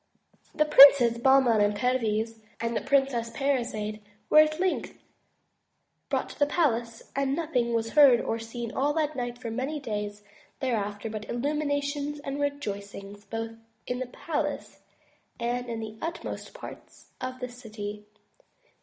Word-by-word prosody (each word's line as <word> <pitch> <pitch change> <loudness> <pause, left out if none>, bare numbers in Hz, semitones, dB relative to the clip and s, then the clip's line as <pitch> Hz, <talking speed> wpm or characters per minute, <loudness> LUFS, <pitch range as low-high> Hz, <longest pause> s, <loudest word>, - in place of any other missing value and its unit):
The 305 - +3
Princes 270 -5 +8
Bahman 255 -4 +5
and 205 0 +2
Perviz 225 -2 0 0.2
and 230 0 -2
the - - 0
Princess 270 -4 +1
Parizade 230 -6 -2 0.3
were 305 - +8
at 310 +1 +4
length 370 -1 -1 1.1
brought - - -1
to - - -12
the 290 - +4
palace, 235 -8 -1
and 275 0 +1
nothing 250 -8 0
was 225 0 -1
heard 280 -5 +7
or 225 - -2
seen 230 0 -6
all 285 +2 +1
that 305 -1 0
night 245 -1 -3
and 245 - -20
for 230 - -3
many 270 +6 -2
days 210 -5 -4 0.4
thereafter 210 -5 -2
but 215 -1 -6
illuminations 285 +2 -1
and 275 0 -4
rejoic 215 -9 -3
ings 200 +1 -10
both 225 0 -4 0.3
in 250 0 -3
the 255 - -3
palace 300 +5 -4 0.6
and 240 +1 -2
in 230 -1 -3
the 220 0 -7
utmost 335 +1 -5
parts - - -12
of 255 0 -4
the 250 - -3
city. 210 -3 -8
245 Hz, 150 wpm, -27 LUFS, 225-280 Hz, 1.1 s, Princes